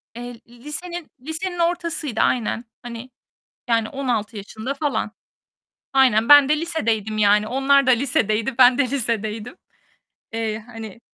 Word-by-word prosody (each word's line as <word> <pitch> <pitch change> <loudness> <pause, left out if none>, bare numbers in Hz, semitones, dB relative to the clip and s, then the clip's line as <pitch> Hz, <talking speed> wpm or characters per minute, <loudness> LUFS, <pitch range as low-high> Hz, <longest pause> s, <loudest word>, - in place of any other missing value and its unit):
Eee, 245 -1 -8
lisenin 300 +8 -7
lisenin 345 +5 -4
ortasıydı 335 -7 -1
aynen. 235 0 0 0.2
Hani, 240 +1 -8 0.6
yani 230 -1 +2
16 235 -6 -2
yaşında 220 +6 -5
falan. 290 +1 -2 0.8
Aynen, 250 -4 +4
ben 290 -2 +8
de 305 +1 +2
lisedeydim 225 - -2
yani 210 0 +4
onlar 275 +2 +3
da 260 - +4
lisedeydi, 245 -2 +1
ben 250 0 +6
de 260 -3 +1
lisedeydim. 230 - -3 0.8
Eee, 225 -1 -2 0.2
hani 225 -1 -9
245 Hz, 125 wpm, -22 LUFS, 220-285 Hz, 0.8 s, ben